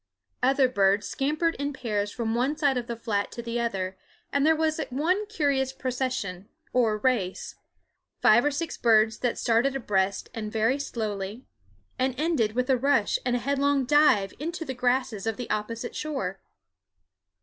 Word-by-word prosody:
Other 265 +1 +4
birds 200 -4 +2
scampered 310 +4 0
in 285 0 -2
pairs 210 -5 -2
from 225 -1 -2
one 260 +6 0
side 285 -4 +2
of 245 -1 -3
the 235 - -3
flat 220 -3 -2
to 235 - -6
the 235 0 -2
other; 190 -5 -2 0.3
and 280 - +2
there 320 +2 +5
was 315 0 0
one 350 +11 0
curious 280 -10 0
procession, 250 -8 -3 0.2
or 225 -4 +2
race, 210 -5 -1 0.7
five 215 +3 +6
or 295 - +3
six 310 +3 -4
birds 220 -1 +4
that 245 -2 -1
started 240 +4 +2
abreast 195 -6 0
and 215 -2 -5
very 225 +5 +1
slowly, 215 -3 -4 0.5
and 260 0 0
ended 300 -10 +1
with 250 +1 0
a 260 - +4
rush 265 -4 +2
and 245 -1 0
a 245 - -3
headlong 280 -1 +2
dive 250 -9 +4
into 330 +2 -4
the 265 - -4
grasses 250 -4 0
of 225 - -1
the 245 - -5
opposite 230 +3 -3
shore. 265 -12 -3
250 Hz, 165 wpm, -27 LUFS, 215-280 Hz, 0.7 s, five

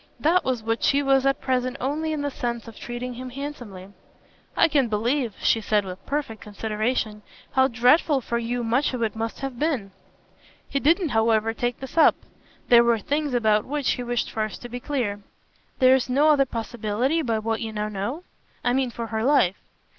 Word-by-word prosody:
That 340 +4 +3
was 250 -4 -1
what 225 +1 -1
she 285 +1 +3
was 270 -1 +3
at 275 - +1
present 255 0 -1
only 300 +5 -1
in 300 -2 -2
the 285 - -2
sense 235 -2 -4
of 225 - -10
treating 240 +2 -6
him 255 +1 -7
handsomely. 245 -9 -7 0.7
"I - - +6
can 285 -5 +2
believe," 230 +2 -1
she 225 - +3
said 210 -1 +1
with 185 0 -8
perfect 275 -7 -3
consideration, 215 +1 -2 0.3
"how 265 0 +4
dreadful 265 +5 +3
for 235 -1 -2
you 240 +1 -2
much 250 +4 +1
of 235 - -2
it 220 -1 -1
must 225 +3 -4
have 270 -3 -5
been." 270 -11 -1 0.8
He 280 - -1
didn't 330 +4 +3
however 225 -1 +2
take 240 +1 -2
this 265 +5 -3
up; - - +6 0.5
there 235 -1 +7
were 235 -1 +3
things 290 +5 -1
about 215 -3 +3
which 290 0 -1
he 250 - -2
wished 240 -1 -2
first 215 +1 -4
to 245 - -7
be 245 +1 -5
clear. 245 -7 -2 0.6
"There's 260 -1 +4
no 285 +5 +4
other 285 -2 +5
possibility, 235 +5 -1
by 230 -6 0
what 225 +1 -2
you 225 -1 -3
now 210 0 -2
know? 215 - -4 0.4
I 245 - +2
mean 260 -1 +1
for 235 0 -5
her 220 -1 -3
life." 255 -9 +3
245 Hz, 190 wpm, -24 LUFS, 225-275 Hz, 0.8 s, there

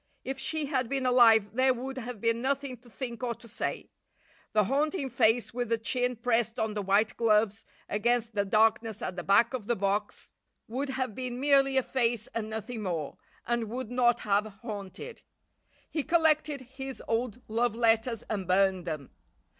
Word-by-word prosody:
If 270 0 -4
she 310 +2 0
had 260 -4 -1
been 270 -2 -1
alive 225 -5 +5
there 260 +1 +3
would 265 +2 -5
have 245 -2 -6
been 230 +2 +1
nothing 275 0 -1
to 240 +1 -19
think 235 +2 -6
or 240 -2 -2
to 230 - -14
say. 225 - -4 0.6
The 215 - +3
haunting 280 - 0
face 225 -2 +2
with 245 -1 -2
the 230 - +2
chin 245 +2 0
pressed 230 -1 0
on 220 -1 -1
the 210 - -2
white 200 +3 +2
gloves 215 -1 +2 0.2
against 235 +2 0
the 205 -1 +1
darkness 220 +1 +2
at 185 - -3
the 175 - -3
back 215 +5 +4
of 235 -5 -4
the 240 - +2
box 200 +1 -2 0.4
would 265 +5 -3
have 260 -4 -2
been 250 +1 -4
merely 275 -1 +4
a 265 - +3
face 235 -4 0
and 220 -1 -3
nothing 220 +1 -5
more, 170 -7 -3 0.3
and 235 -2 -1
would 245 0 -5
not 240 -1 +3
have 205 +1 +1 0.2
haunted. 215 - -7 0.7
He 310 - 0
collected 310 -3 +2
his 265 +1 -8
old 230 0 -1
love 230 +1 0
letters 230 0 +2
and 195 -4 -4
burned 190 -1 +2
them. 155 -5 -5
235 Hz, 180 wpm, -29 LUFS, 215-255 Hz, 0.7 s, alive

